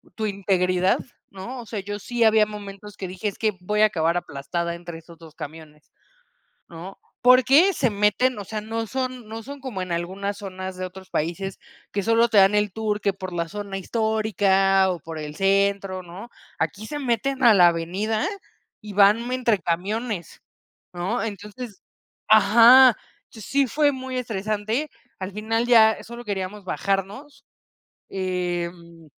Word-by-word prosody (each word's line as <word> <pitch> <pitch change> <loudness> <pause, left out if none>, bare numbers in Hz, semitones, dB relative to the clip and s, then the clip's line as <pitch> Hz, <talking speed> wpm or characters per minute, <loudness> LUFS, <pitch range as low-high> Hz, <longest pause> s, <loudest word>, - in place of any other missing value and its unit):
tu 220 - -2
integridad, 185 -2 +1 0.3
¿no? 215 +7 -8
O 230 - -13
sea, 210 0 -4
yo 205 +1 -5
sí 235 +3 -1
había 220 -1 +5
momentos 205 -1 -9
que 190 - -5
dije: 185 +3 -4
"Es 200 - -4
que 215 -3 0
voy 210 +4 -1
a - - +8
acabar 170 -4 +1
aplastada 170 +2 -4
entre 170 -1 -9
esos 165 +1 -16
2 160 -1 -14
camiones", 150 0 -11 0.8
¿no? 175 +3 -10 0.2
Porque 260 +9 +6
se 250 -4 +1
meten, 210 +4 +1
o 205 - -6
sea, 215 +2 -5
no 225 +1 -4
son 255 -1 -4
no 225 +1 -7
son 280 +4 -9
como 240 -8 -5
en 185 - -6
algunas 190 +4 -3
zonas 185 -1 -7
de 185 - -4
otros 185 +1 -12
países 180 +5 -3 0.3
que 200 - -1
solo 230 +1 +3
te 220 - +3
dan 195 +1 +6
el 210 -1 +1
tour 215 0 -2
que 200 - +1
por 185 -1 -8
la 170 -1 -2
zona 200 0 -5
histórica 195 -2 +2
o 175 -2 -4
por 160 +1 -8
el 150 -1 -6
centro, 195 -1 +1
¿no? 180 +7 -10 0.3
Aquí 215 +2 -2
se 295 +5 -5
meten 265 +1 -1
a 235 -2 +8
la 180 -4 +7
avenida 190 +7 -1 0.6
y 210 -1 -9
van 210 +5 +4
entre 240 -4 +1
camiones, 190 +3 -3 0.5
¿no? 185 +7 -2
Entonces, 210 0 -7 0.5
ajá, 235 +3 +7 0.3
sí 270 +6 -1
fue 290 +3 +2
muy 260 -1 -6
estresante. 215 +4 -2 0.3
Al 190 +1 -5
final 225 +3 -1
ya 220 -2 +5
solo 235 +1 -9
queríamos 200 0 -4
bajarnos. 200 +10 -3 0.7
Em, 175 -3 -4
205 Hz, 160 wpm, -23 LUFS, 185-225 Hz, 0.8 s, a